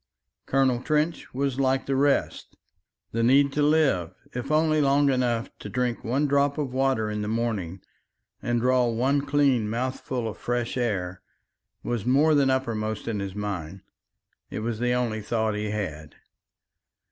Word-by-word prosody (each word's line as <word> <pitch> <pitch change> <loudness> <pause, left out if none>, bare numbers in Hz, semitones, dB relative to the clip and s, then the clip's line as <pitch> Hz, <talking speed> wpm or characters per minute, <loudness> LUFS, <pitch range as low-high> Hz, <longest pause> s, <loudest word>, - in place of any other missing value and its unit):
Colonel 130 -3 +2
Trench 155 +4 -1
was 135 0 -2
like 135 0 +1
the 135 - 0
rest. 140 +1 0 0.5
The 115 - -1
need 135 +4 +4
to 150 - 0
live, 145 - +2 0.2
if 125 +3 -4
only 155 0 +3
long 140 0 +3
enough 120 -3 0
to 105 - -7
drink 125 +1 -1
one 130 +6 +1
drop 140 0 +2
of 140 -4 -3
water 130 -5 +1
in 105 0 -3
the 105 - -3
morning 105 -6 -2 0.6
and 120 0 0
draw 125 0 +3
one 130 +5 +1
clean 140 -6 +2
mouthful 125 0 -3
of 110 - -7
fresh 120 -1 -2
air, 95 -7 -2 0.6
was 120 -4 -2
more 140 +6 +4
than 140 -2 +4
uppermost 110 -5 -2
in 110 -3 -2
his 100 -1 -5
mind. 95 -3 -5 0.7
It - - -5
was 115 0 -3
the 125 0 +1
only 120 -3 -1
thought 110 0 -1
he 105 0 -3
had. 80 -8 -5
125 Hz, 160 wpm, -26 LUFS, 110-135 Hz, 0.7 s, need